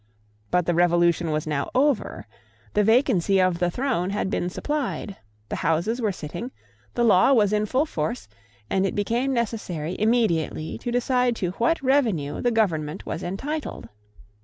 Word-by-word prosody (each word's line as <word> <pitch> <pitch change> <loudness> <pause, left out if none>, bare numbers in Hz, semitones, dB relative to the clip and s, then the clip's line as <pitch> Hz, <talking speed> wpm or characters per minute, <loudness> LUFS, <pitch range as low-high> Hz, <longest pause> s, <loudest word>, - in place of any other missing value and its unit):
But 180 -1 +2
the 175 - +1
Revolution 175 -1 +3
was 155 0 -1
now 145 -2 -2
over: 275 -2 +1 0.5
the 210 - +3
vacancy 200 -4 +3
of 185 -2 +2
the 175 -1 +2
throne 210 -4 -1
had 200 -1 -2
been 175 - -1
supplied: 275 -3 -3 0.3
the - - -3
Houses 175 +10 0
were 215 -3 +1
sitting: 185 +8 -6 0.5
the 240 - +1
law 225 +3 +5
was 210 -4 +3
in 210 0 +1
full 265 +7 +1
force; 150 - -3 0.4
and 190 - +1
it - - -4
became 235 +6 0
necessary 200 - -2
immediately 210 -9 0
to 240 - -4
decide 245 0 +1
to 180 -5 -2
what 270 +6 +1
revenue 225 - +1
the 245 - +2
Government 165 -10 0
was 160 - -4
entitled. 270 - -5
205 Hz, 160 wpm, -24 LUFS, 170-245 Hz, 0.5 s, law